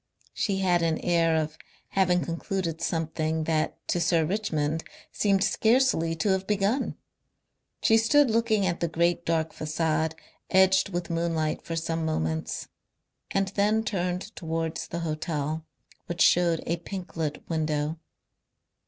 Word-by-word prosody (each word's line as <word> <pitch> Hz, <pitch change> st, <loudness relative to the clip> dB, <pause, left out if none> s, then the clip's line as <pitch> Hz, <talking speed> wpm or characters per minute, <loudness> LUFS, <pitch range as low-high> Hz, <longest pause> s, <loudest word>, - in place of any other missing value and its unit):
She 195 Hz, -3 st, 0 dB
had 175 Hz, -2 st, +3 dB
an 165 Hz, -1 st, +1 dB
air 165 Hz, -2 st, +2 dB
of 155 Hz, 0 st, -2 dB, 0.3 s
having 180 Hz, -2 st, +2 dB
concluded 170 Hz, -1 st, -3 dB
something 160 Hz, -1 st, -1 dB
that 155 Hz, -1 st, 0 dB
to 175 Hz, -, +1 dB
Sir 160 Hz, -1 st, +3 dB
Richmond 160 Hz, -5 st, -1 dB, 0.3 s
seemed 195 Hz, -2 st, +2 dB
scarcely 220 Hz, -7 st, +2 dB
to 165 Hz, +6 st, 0 dB
have 190 Hz, 0 st, +1 dB
begun. 210 Hz, +5 st, 0 dB, 0.9 s
She 225 Hz, -1 st, +5 dB
stood 275 Hz, +3 st, +4 dB
looking 220 Hz, -3 st, +2 dB
at 175 Hz, -2 st, -1 dB
the 170 Hz, -, 0 dB
great 170 Hz, +1 st, 0 dB
dark 160 Hz, -1 st, 0 dB
facade 160 Hz, 0 st, -1 dB, 0.3 s
edged 190 Hz, 0 st, +4 dB
with 175 Hz, -2 st, -3 dB
moonlight 165 Hz, -2 st, 0 dB
for 165 Hz, -, -5 dB
some 165 Hz, 0 st, -2 dB
moments, 80 Hz, -, -2 dB, 0.6 s
and 195 Hz, 0 st, 0 dB
then 210 Hz, +3 st, +2 dB
turned 185 Hz, -1 st, -2 dB
towards 165 Hz, -1 st, -3 dB
the 170 Hz, -, -4 dB
hotel, 155 Hz, -1 st, -3 dB, 0.4 s
which 175 Hz, -1 st, -3 dB
showed 170 Hz, -2 st, +4 dB
a 170 Hz, -, 0 dB
pink 185 Hz, +2 st, -7 dB
lit 155 Hz, -3 st, -3 dB
window. 155 Hz, -1 st, -1 dB
170 Hz, 135 wpm, -27 LUFS, 160-190 Hz, 0.9 s, She